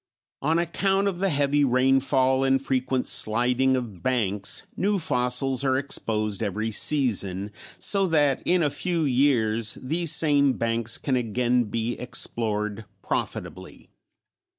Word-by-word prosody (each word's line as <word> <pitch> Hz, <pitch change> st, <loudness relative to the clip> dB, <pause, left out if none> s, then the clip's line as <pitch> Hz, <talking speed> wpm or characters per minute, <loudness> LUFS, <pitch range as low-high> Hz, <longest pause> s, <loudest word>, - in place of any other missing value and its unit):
On 160 Hz, +4 st, +1 dB
account 195 Hz, +4 st, 0 dB
of 185 Hz, -3 st, -3 dB
the 195 Hz, 0 st, +1 dB
heavy 145 Hz, -1 st, +1 dB
rainfall 130 Hz, 0 st, +2 dB
and 135 Hz, 0 st, +2 dB
frequent 130 Hz, -1 st, -1 dB
sliding 125 Hz, +4 st, +2 dB
of 115 Hz, -8 st, -5 dB
banks 105 Hz, -6 st, -1 dB
new 205 Hz, +2 st, 0 dB
fossils 125 Hz, -3 st, 0 dB
are 130 Hz, -1 st, +2 dB
exposed 110 Hz, -6 st, -1 dB
every 110 Hz, +3 st, -2 dB
season 105 Hz, -7 st, +1 dB, 0.3 s
so 195 Hz, -2 st, +1 dB
that 145 Hz, -5 st, +2 dB
in 180 Hz, -1 st, +2 dB
a 145 Hz, -, +1 dB
few 170 Hz, +3 st, -1 dB
years 120 Hz, -6 st, +1 dB
these 160 Hz, +5 st, -1 dB
same 145 Hz, -4 st, +3 dB
banks 115 Hz, -1 st, -1 dB
can 135 Hz, -, -1 dB
again 125 Hz, +1 st, 0 dB
be 115 Hz, +3 st, -3 dB
explored 110 Hz, -3 st, -2 dB, 0.2 s
profitably. -, -, -5 dB
130 Hz, 130 wpm, -25 LUFS, 115-145 Hz, 0.3 s, same